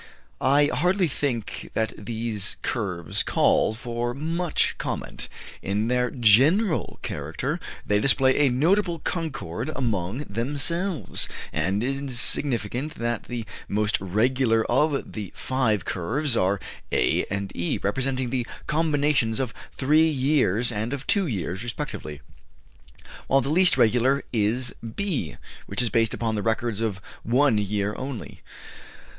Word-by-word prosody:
I 145 +2 +5
hardly 180 +2 +2
think 130 -6 -3
that 110 0 0
these 110 -1 -3
curves 90 -9 -2
call 110 - +3
for 120 0 -3
much 165 +3 0
comment. - - -4 0.3
In 105 +4 -1
their 125 0 +2
general 140 - +4
character - - -3 0.3
they 105 0 +2
display 130 +2 +4
a 145 -2 +5
notable 170 +7 +2
concord 135 - -3
among 115 -1 -1
themselves; 145 - -1 0.2
and 95 +7 0
it - - 0 0.2
is 130 -4 -2
significant 130 +2 0
that 120 -1 -2
the 120 -2 -4 0.2
most 105 0 0
regular 115 +4 +2
of 140 +3 +1
the 105 -4 -5
five 110 -8 0
curves 120 - -1
are 95 -1 +2 0.3
A - - +2
and 100 0 -3
E, 85 - -1
representing 130 +3 -1
the 125 -2 -1 0.2
combinations 145 -7 +1
of 130 -3 -2 0.2
three 155 +4 +4
years 130 -6 +2
and 110 +4 -2
of 135 - -9
two 200 -4 +2
years, 95 - -3
respectively, 120 - -5 1.1
while 135 +1 +4
the 135 - -3
least 175 +3 +5
regular 125 +5 +3
is 115 +3 +2
B, 125 - -3 0.3
which - - -3
is 115 - -1
based 115 0 +2
upon 115 -1 -1
the 105 - -1
records 115 0 -1
of 105 -4 -1 0.2
one 125 -1 +3
year 105 0 -1
only. 130 -3 -6
120 Hz, 130 wpm, -25 LUFS, 105-140 Hz, 1.1 s, I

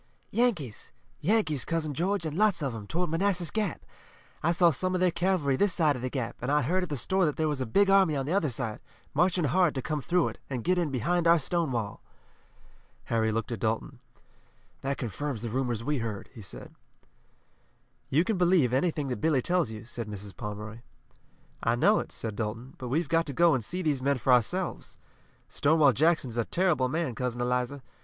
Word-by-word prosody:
"Yankees! 190 - -1 0.3
Yankees, 155 - +1
Cousin 160 -3 -2
George, 180 +4 -1
and 155 -1 -3
lots 200 -4 +2
of 135 -4 -1
'em, 105 -3 -7
toward 175 - -1
Manassas 180 -1 0
Gap! 210 -6 -2 0.6
I 170 - +2
saw 170 0 +4
some 185 +6 0
of - - 0
their 180 -1 +3
cavalry 170 -5 +1
this 195 +5 +2
side 155 -4 +3
of 125 - -6
the 130 - -2
Gap, 125 -4 -4
and 125 +3 -1
I 150 0 +3
heard 180 +8 +1
at 180 - -4
the 145 - -2
store 190 +8 +1
that 150 - -1
there 160 - +1
was 145 -3 -2
a 130 - -2
big 200 - +3
army 195 -5 +4
on 135 -1 -1
the 155 - -1
other 190 -7 +2
side, 115 -3 -3 0.3
marching 175 +3 +2
hard 170 +2 +2
to 130 - -1
come 150 -2 -2
through 175 +5 +1
it, - - -11
and 125 -4 -3
get 180 0 +2
in 170 -3 0
behind 165 +7 0
our 170 +1 +7
Stonewall." 135 - -2 1.1
Harry 110 -1 +2
looked 115 +2 -2
at 115 - -3
Dalton. 115 +5 -2 0.8
"That 140 +1 -2
confirms 125 0 -4
the 115 - -3
rumors 120 -3 -1
we 145 +1 0
heard," 110 -3 -5
he 115 - -10
said. 95 - -11 1.4
"You 155 +5 +3
can 195 -1 -1
believe 175 -9 +3
anything 150 +1 0
that 125 - -4
Billy 150 -5 +2
tells 175 -7 +1
you," 110 0 -8
said 120 -1 -6
Mrs. 100 -1 -8
Pomeroy. 105 +2 -6 0.8
"I 115 - +2
know 205 - +4
it," - - -6
said 110 -2 -4
Dalton, 115 +5 -4
"but 125 - -5
we've 150 +6 0
got 165 +1 +1
to 140 - -4
go 170 +5 +5
on 145 - +3
and 120 - -5
see 180 - -4
these 145 -5 0
men 140 +1 +1
for 125 +1 +3
ourselves. 175 - 0 0.5
Stonewall 145 -2 +3
Jackson 155 0 +2
is 115 - -7
a 120 - +2
terrible 170 -8 +1
man, 155 -2 -1
Cousin 120 0 -3
Eliza. 125 +2 -1
145 Hz, 210 wpm, -28 LUFS, 125-175 Hz, 1.4 s, our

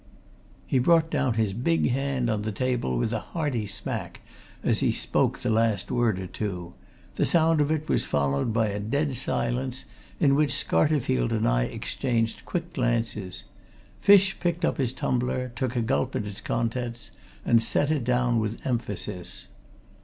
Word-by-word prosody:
He 130 - +1
brought 165 +4 +4
down 130 -5 +1
his 110 -3 +1
big 130 +6 +1
hand 135 -1 0
on 110 -2 0
the 110 +1 -3
table 120 - -1
with 110 - 0
a 110 - 0
hearty 135 -7 -3
smack 100 - -4 0.4
as - - +3
he - - +2
spoke - - +1
the 120 - -1
last 110 -3 +1
word 115 -5 +2
or 95 - -4
two; 90 -2 -5 0.4
the - - +3
sound 165 -2 +3
of 145 - +1
it 155 -1 -1
was - - +2
followed 70 +6 0
by 110 -1 +1
a 100 0 -3
dead 140 +6 -1
silence, 125 +1 -1 0.3
in 140 -3 +4
which 145 +1 +3
Scarterfield 125 - +2
and - - +1
I - - +2
exchanged 115 -3 -2
quick 175 -1 -4
glances. 115 -7 -1 0.6
Fish 200 -1 +5
picked 175 -1 0
up - - 0
his 125 -3 +1
tumbler, 125 0 -1
took 125 -1 -2
a 120 - +1
gulp 130 +2 0
at 105 - -1
its 105 0 -5
contents, 115 +1 -3 0.3
and 115 -1 +4
set 145 +6 +2
it 150 -5 0
down 120 -1 +2
with 110 +1 -4
emphasis. 105 -7 -3
120 Hz, 170 wpm, -26 LUFS, 110-135 Hz, 0.6 s, Fish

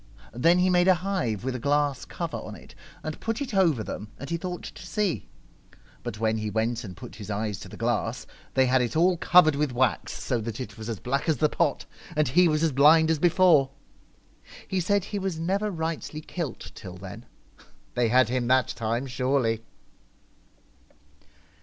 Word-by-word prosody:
Then 165 +9 +4
he 185 +1 +3
made 175 0 +4
a 185 - +6
hive 175 - -2
with 130 0 -2
a 125 - -4
glass 145 +1 +1
cover - - -4
on - - -8
it - - -14 0.3
and 155 -1 -5
put 225 0 -2
it 270 -5 -4
over 165 - +3
them, 105 - -6
and 140 - -8
he - - +1
thought 180 +1 -5
to - - -9
see. 200 -3 -1 0.7
But 105 - -6
when 110 0 +1
he 110 0 -2
went 115 +3 -1
and 90 -5 -9
put 105 - -10
his 105 -1 -9
eyes 105 -1 -2
to - - -10
the - - -10
glass, - - -1 0.3
they 130 - +5
had 130 0 +3
it 120 +1 -2
all 175 +3 +4
covered 165 -3 +5
with 145 -1 0
wax 125 -1 0
so 120 - -2
that 115 +1 -5
it 130 - -6
was 110 0 -7
as 110 -4 -4
black 140 +5 -1
as 155 - +2
the 155 - +2
pot; 160 -3 0 0.3
and 150 -1 +2
he 175 +7 +5
was 155 0 +1
as 165 - +3
blind 155 +4 +6
as 160 - +1
before. 170 -5 +5 1.0
He 190 - -1
said 200 +2 +1
he 205 +1 -4
was 190 -4 -2
never 195 +5 0
rightly 160 -3 -4
kilt 160 -5 -6
till 90 -4 -9
then. 100 +5 -10 0.7
They 120 -1 +2
had 125 +1 +4
him 125 0 -1
that 130 -1 +3
time 115 +3 -2
surely 125 -3 0
140 Hz, 195 wpm, -26 LUFS, 115-175 Hz, 1.0 s, a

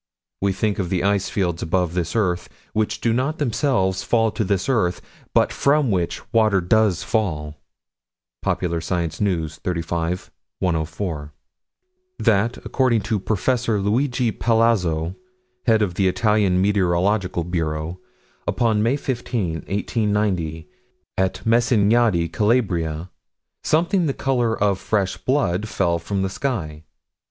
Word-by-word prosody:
We 100 0 +2
think 105 +2 -1
of 90 -3 -1
the 90 -2 0
ice 100 -1 +1
fields 85 -4 -1
above 90 0 0
this 90 +1 -2
earth: 90 -6 0 0.2
which 110 0 -1
do 115 - +2
not, 135 +6 0
themselves, 115 -8 +1
fall 115 -2 +2
to 110 - -1
this 95 -1 0
earth, 105 -10 +1 0.3
but - - +2
from 140 -3 +2
which 90 -3 -1
water 110 -4 +4
does 95 -1 +2
fall 80 -8 -2 0.8
Popular 85 -2 -1
Science 85 -1 -2
News, 80 -6 -1
35 85 +1 -3 0.3
104: 80 -3 -2 0.8
That, 115 +1 +2
according 125 -4 +2
to 105 +1 -1
Prof. 120 +5 0
Luigi 115 +4 +1
Palazzo, 95 -9 +1 0.5
head 110 -2 +4
of 95 -4 -1
the 95 +1 +1
Italian 95 0 +2
Meteorological 95 -1 +1
Bureau, 80 0 -3 0.5
upon 110 -3 +2
May 115 +5 +2
15, 120 - -2
1890, 100 -6 -1 0.5
at 95 -1 -1
Messignadi, 115 -5 +3
Calabria, 90 -5 0 0.5
something 170 +3 +2
the 135 - -1
color 120 -4 0
of 100 -2 +2
fresh 100 -4 0
blood 110 -7 0
fell 85 -5 +1
from 95 +3 -2
the 95 - 0
sky. 85 - -3
100 Hz, 125 wpm, -22 LUFS, 85-115 Hz, 0.8 s, water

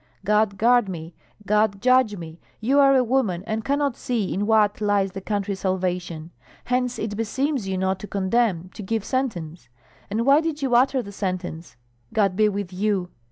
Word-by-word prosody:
God 210 -1 +2
guard 240 0 +4
me, 165 -2 -7 0.3
God 210 -1 +2
judge 255 -2 +3
me! 165 -1 -9 0.2
You 265 +6 +2
are 275 -1 +6
a 255 - +4
woman, 225 -8 0
and 220 0 -2
cannot 280 -1 0
see 230 -6 -2
in 205 +2 -1
what 215 -2 +3
lies 205 -2 +1
the 195 +1 -7
country's 200 -1 -2
salvation; 180 -3 -2 0.3
hence 250 0 0
it 215 -1 -3
beseems 260 +2 -1
you 190 -1 -2
not 190 0 0
to 210 - -8
condemn, 190 -3 0
to - - -8
give 215 +1 -2
sentence. 175 - -3 0.4
And 220 +3 -1
why 280 +3 +6
did 320 -2 -3
you 260 -2 0
utter 255 +1 +3
the 200 - -9
sentence? 180 - -4 0.4
God 195 -4 +2
be 215 +1 +4
with 200 -2 -4
you! 190 -2 -1
210 Hz, 180 wpm, -23 LUFS, 190-245 Hz, 0.4 s, are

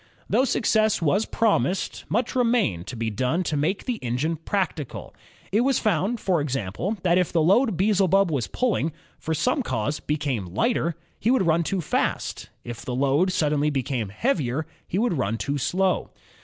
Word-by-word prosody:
Though 260 - +3
success 220 -4 +2
was 185 +7 +1
promised, 190 - 0
much 235 +4 0
remained 230 - +1
to 130 - -6
be 115 -1 -2
done 130 - 0
to 160 - -2
make 155 +7 -1
the 250 -3 -1
engine 125 +7 -1
practical. 165 -4 -3 0.4
It 210 +4 +3
was 265 0 +2
found, 215 +3 0
for 180 -6 +1
example, 135 - -2
that 180 0 +4
if 180 - 0
the 170 - +2
load 195 +5 +3
Beelzebub 195 -2 +3
was 135 -6 -1
pulling, 210 - 0 0.3
for 160 - -2
some 255 - +1
cause 130 - -2
became 130 - -2
lighter, 200 - +1 0.2
he 225 - +1
would 250 -7 +3
run 165 0 +3
too 185 +2 -1
fast; - - -2
if 120 -1 -7
the 125 -2 -3
load 140 +8 +2
suddenly 150 -3 +1
became 130 -6 -2
heavier, 155 - -1 0.2
he 180 - -2
would 210 - +1
run 115 -1 0
too 140 +4 -2
slow. 185 +7 0
165 Hz, 170 wpm, -25 LUFS, 135-205 Hz, 0.4 s, that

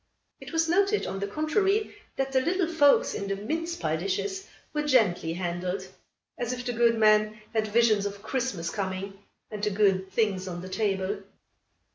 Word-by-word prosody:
It - - -10
was 325 -1 +1
noted, 400 +5 +2
on 195 - -4
the 200 - -2
contrary, 390 - +1 0.2
that 270 0 -1
the 260 -1 +3
little 360 +5 +1
folks 320 -4 +4
in 200 - -4
the 195 - -1
mince 325 - -3
pie 160 - -1
dishes 290 - -3 0.3
were 300 - 0
gently 215 - +2
handled, 180 +2 -3 0.5
as 240 -1 -1
if 250 -1 -5
the 245 - -1
good 235 0 +3
man 215 0 +4
had 220 -1 +1
visions 215 -2 +3
of 200 0 -8
Christmas 235 -11 -2
coming 195 0 -4 0.3
and 210 -1 -5
the 210 - +2
good 195 -2 +2
things 195 -3 0
on 175 -1 -5
the 185 - -7
table. 195 -1 -1
215 Hz, 175 wpm, -27 LUFS, 190-280 Hz, 0.5 s, folks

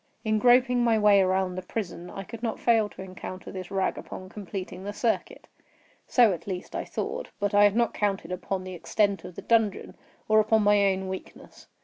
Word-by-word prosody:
In 215 0 +2
groping 245 +1 +4
my 230 -2 +3
way 205 -2 +5
around 185 0 +1
the 185 - -4
prison, 180 -2 -5
I 195 - -7
could 225 +3 -10
not 230 -2 -2
fail 225 -3 +3
to 190 - -10
encounter 185 0 -8
this 185 -2 -7
rag 195 -1 -1
upon 185 0 -9
completing 190 -2 -7
the 205 +1 -5
circuit. 225 +2 -2 0.6
So, 235 -6 +5
at 175 - -8
least 185 -2 -5
I - - -3
thought: - - -4
but 205 -1 -1
I 205 0 +7
had 205 0 +3
not 235 0 +2
counted 195 -4 -1
upon 185 +1 -3
the 185 0 -7
extent 200 +3 0
of 180 - -9
the - - -8
dungeon, 225 -4 +1 0.3
or 215 0 +5
upon 220 0 +3
my 205 -1 +4
own 190 0 -3
weakness. 190 0 -9
200 Hz, 205 wpm, -27 LUFS, 185-220 Hz, 0.6 s, I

